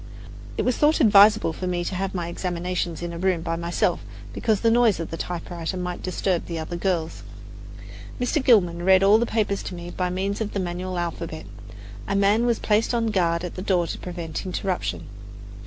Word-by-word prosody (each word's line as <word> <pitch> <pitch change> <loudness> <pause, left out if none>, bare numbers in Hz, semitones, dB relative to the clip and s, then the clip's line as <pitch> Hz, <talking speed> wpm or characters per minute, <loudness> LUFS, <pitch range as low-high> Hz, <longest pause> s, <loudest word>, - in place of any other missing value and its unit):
It - - +1
was 250 - +1
thought 305 +2 +3
advisable 210 - +6
for 185 - -5
me 175 -1 -1
to 180 - -4
have 190 +1 -3
my 175 -2 -2
examinations 175 -1 -3
in 170 0 -4
a 170 - -6
room 185 -2 +1
by 165 -1 -2
myself, 170 +1 0 0.3
because 220 -3 0
the 230 - +3
noise 230 -5 +4
of 165 - -5
the - - -3
typewriter 175 +1 -4
might 180 -1 -4
disturb 185 -1 -1
the 170 - -4
other 160 +2 -5
girls. 170 -2 -2 1.0
Mr. 250 +3 0
Gilman 180 -9 +4
read 190 +1 +5
all 205 +3 +6
the 235 - 0
papers 205 -3 0
to 180 - -6
me 175 0 -7
by 180 0 -2
means 195 +3 -2
of 210 - -3
the 200 - -1
manual 180 0 -3
alphabet. 170 - -4 0.6
A 200 - -1
man 205 +4 +3
was 235 -2 +2
placed 215 +3 +1
on 230 -1 0
guard 170 -4 +1
at 180 - -5
the 185 - -6
door 185 -3 +1
to - - -5
prevent 170 -3 -5
interruption. 180 - -3
180 Hz, 200 wpm, -24 LUFS, 170-200 Hz, 1.0 s, advisable